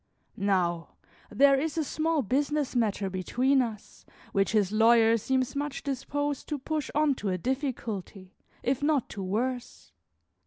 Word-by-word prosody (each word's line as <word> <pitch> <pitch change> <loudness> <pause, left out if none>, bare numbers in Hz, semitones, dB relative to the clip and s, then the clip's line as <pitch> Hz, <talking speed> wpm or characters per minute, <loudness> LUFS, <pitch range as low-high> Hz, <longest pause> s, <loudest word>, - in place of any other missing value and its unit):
Now, 180 -4 0 0.3
there 275 0 +5
is 315 +2 -2
a 320 - +2
small 310 0 0
business 285 +4 0
matter 210 -4 +1
between 250 +9 +1
us, 220 -4 -6 0.3
which 195 +3 +1
his 205 -3 +2
lawyer 225 +1 +5
seems 260 +3 -1
much 290 0 -3
disposed 290 +1 -3
to 295 - -1
push 300 +1 -3
on 300 -1 +3
to 210 -6 -4
a 185 - 0
difficulty, 220 - -4 0.3
if 265 +1 0
not 290 -3 +1
to 200 - -6
worse. 240 +6 -3
255 Hz, 145 wpm, -28 LUFS, 205-285 Hz, 0.3 s, there